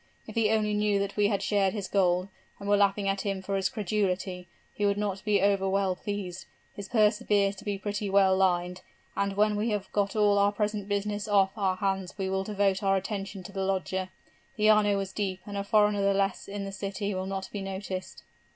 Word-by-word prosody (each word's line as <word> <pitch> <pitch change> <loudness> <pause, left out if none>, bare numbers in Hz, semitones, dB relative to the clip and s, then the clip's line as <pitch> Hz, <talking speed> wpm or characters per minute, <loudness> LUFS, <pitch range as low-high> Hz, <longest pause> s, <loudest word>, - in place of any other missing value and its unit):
If - - -9
he 225 -2 +2
only 215 -1 +1
knew 210 -1 +2
that 200 0 -2
we 205 -1 +3
had 200 -1 -1
shared 200 -2 +2
his 200 -3 -3
gold, 180 -2 +2 0.3
and 200 - -7
were 205 - +4
laughing 200 0 +2
at 195 0 0
him 195 -2 -3
for 195 +1 -2
his 190 -1 +1
credulity, 190 -4 -2 0.3
he 205 - -4
would 200 0 +2
not 200 -2 -2
be 205 -2 +2
over 195 -1 +2
well 195 -1 +1
pleased. 190 -2 -5 0.3
His 200 -1 -7
purse 215 -1 +3
appears 200 -3 +2
to - - -10
be 205 -1 -2
pretty 205 +1 -3
well 190 -1 +4
lined, 180 -1 +1 0.3
and 200 0 -1
when 210 0 +3
we 215 +3 0
have 205 -2 -3
got 200 0 0
all 205 -1 +4
our 200 0 +4
present 210 -1 -2
business 205 +1 -1
off 195 -2 +3
our 195 -3 0
hands 190 -1 -2
we 190 -1 -2
will 190 0 0
devote 195 -2 0
our 195 -1 +3
attention 195 -1 -5
to 185 - -9
the 195 -1 -4
lodger. 190 -1 -1 0.5
The 215 -1 +3
Arno 205 -2 +3
is 190 -1 -6
deep 190 -3 -2
and 205 - -7
a 200 - -1
foreigner 210 0 +3
the 200 0 +2
less 195 -1 0
in 200 0 -5
the 195 - -5
city 200 +1 -3
will 185 0 -3
not 195 -1 -4
be 205 - -4
noticed.' 190 -1 -6
200 Hz, 225 wpm, -28 LUFS, 190-205 Hz, 0.5 s, were